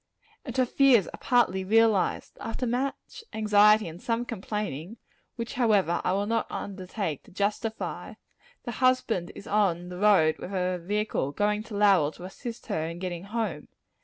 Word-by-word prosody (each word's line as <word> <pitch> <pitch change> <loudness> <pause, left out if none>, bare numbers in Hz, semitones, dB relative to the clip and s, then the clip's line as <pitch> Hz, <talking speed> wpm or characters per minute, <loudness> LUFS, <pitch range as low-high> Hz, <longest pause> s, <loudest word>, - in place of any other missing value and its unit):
And 250 -2 -6
her 255 - +4
fears 250 -6 +4
are - - -10
partly 210 -7 +2
realized. 220 0 +2
After 230 +3 -3
much 255 - -3
anxiety 210 -1 +5
and 165 +3 -9
some 235 +1 -1
complaining 210 - -5 0.4
which, 235 0 -5
however, 205 -8 +2
I - - +1
will 200 +1 0
not 230 +2 0
undertake 185 - -4
to - - -17
justify 210 +3 -3 0.5
the 240 - -4
husband 240 -7 +1
is - - -10
on 185 -5 +1
the 180 0 -7
road 190 -7 +4
with 195 - -7
a 180 -1 0
vehicle, 205 -7 -1
going 210 +2 +1
to 215 -2 -6
Lowell 195 -8 +4
to 175 - -12
assist 230 +5 -8
her 160 -8 -2
in 170 +1 -6
getting 175 0 -5
home. 225 +2 -3
210 Hz, 160 wpm, -27 LUFS, 185-230 Hz, 0.5 s, anxiety